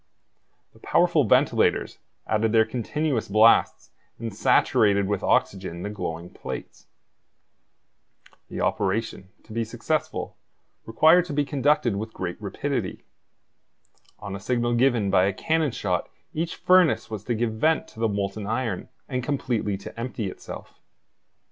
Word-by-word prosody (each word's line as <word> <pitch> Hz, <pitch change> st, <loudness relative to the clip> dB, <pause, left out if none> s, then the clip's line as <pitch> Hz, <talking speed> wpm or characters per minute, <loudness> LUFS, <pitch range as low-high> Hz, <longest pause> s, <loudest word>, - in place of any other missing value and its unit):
The -, -, -20 dB
powerful -, -, +3 dB
ventilators -, -, +2 dB, 0.3 s
added 110 Hz, 0 st, +1 dB
their 110 Hz, -1 st, +5 dB
continuous 125 Hz, +3 st, -2 dB
blasts 110 Hz, +3 st, +4 dB, 0.3 s
and 115 Hz, -2 st, -5 dB
saturated 100 Hz, 0 st, +3 dB
with 100 Hz, -1 st, -1 dB
oxygen 95 Hz, -3 st, 0 dB
the 105 Hz, -, -4 dB
glowing 85 Hz, -4 st, -5 dB
plates. -, -, -8 dB, 1.6 s
The -, -, -5 dB
operation, 100 Hz, -1 st, -1 dB
to 110 Hz, -, -12 dB
be 115 Hz, +1 st, 0 dB
successful, 120 Hz, +7 st, -3 dB, 0.5 s
required 160 Hz, +10 st, +5 dB
to 165 Hz, -, -6 dB
be 145 Hz, 0 st, +1 dB
conducted 140 Hz, -6 st, +1 dB
with 110 Hz, +2 st, -5 dB
great 90 Hz, -2 st, -5 dB
rapidity. -, -, -3 dB, 1.1 s
On 100 Hz, -2 st, -6 dB
a -, -, -6 dB
signal 120 Hz, +2 st, 0 dB
given 120 Hz, -5 st, +2 dB
by 90 Hz, -, +4 dB
a 100 Hz, -, 0 dB
cannon 160 Hz, -, 0 dB
shot 95 Hz, -6 st, -2 dB, 0.2 s
each 165 Hz, +2 st, -2 dB
furnace 180 Hz, -9 st, +3 dB
was 105 Hz, -2 st, -5 dB
to 120 Hz, -, -1 dB
give 115 Hz, 0 st, -1 dB
vent 155 Hz, +9 st, +1 dB
to -, -, -15 dB
the 115 Hz, -1 st, +1 dB
molten 100 Hz, 0 st, -3 dB
iron 110 Hz, -4 st, -2 dB, 0.2 s
and 130 Hz, -2 st, -2 dB
completely 120 Hz, -7 st, -1 dB
to 100 Hz, -, -10 dB
empty 115 Hz, -5 st, -3 dB
itself. -, -, -10 dB
110 Hz, 135 wpm, -25 LUFS, 100-130 Hz, 1.6 s, their